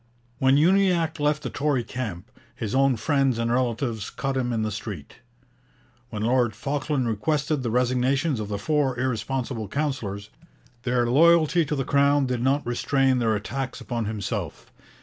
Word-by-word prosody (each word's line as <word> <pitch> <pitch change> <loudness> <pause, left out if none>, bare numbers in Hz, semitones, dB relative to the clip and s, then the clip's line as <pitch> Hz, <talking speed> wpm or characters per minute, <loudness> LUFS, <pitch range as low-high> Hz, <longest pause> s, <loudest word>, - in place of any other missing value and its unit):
When 130 0 +4
Uniacke 170 -1 +3
left 150 0 +1
the 130 - -4
Tory 145 -4 0
camp, 115 -4 -6 0.2
his 110 -4 -4
own 135 -1 +3
friends 135 0 +1
and 115 0 -1
relatives 120 -3 -1
cut 135 -1 -3
him 125 -2 -1
in 110 -2 -1
the 110 - -2
street. 100 -8 -7 0.9
When 105 -3 -4
Lord 120 -2 +2
Falkland 140 +1 -1
requested 145 +6 0
the 120 - -2
resignations 125 +3 +1
of 105 - -4
the 100 - -2
four 135 +2 0
irresponsible 125 -2 -2
councillors, 105 -7 -3 0.5
their 125 -1 +1
loyalty 165 +4 +4
to 150 - -2
the 135 -2 -2
Crown 140 0 +3
did 125 -2 -2
not 135 +3 +1
restrain 130 +2 +1
their 110 -2 +1
attacks 125 +5 -4
upon 120 -2 -3
himself. 105 -1 -4
130 Hz, 155 wpm, -25 LUFS, 115-145 Hz, 0.9 s, When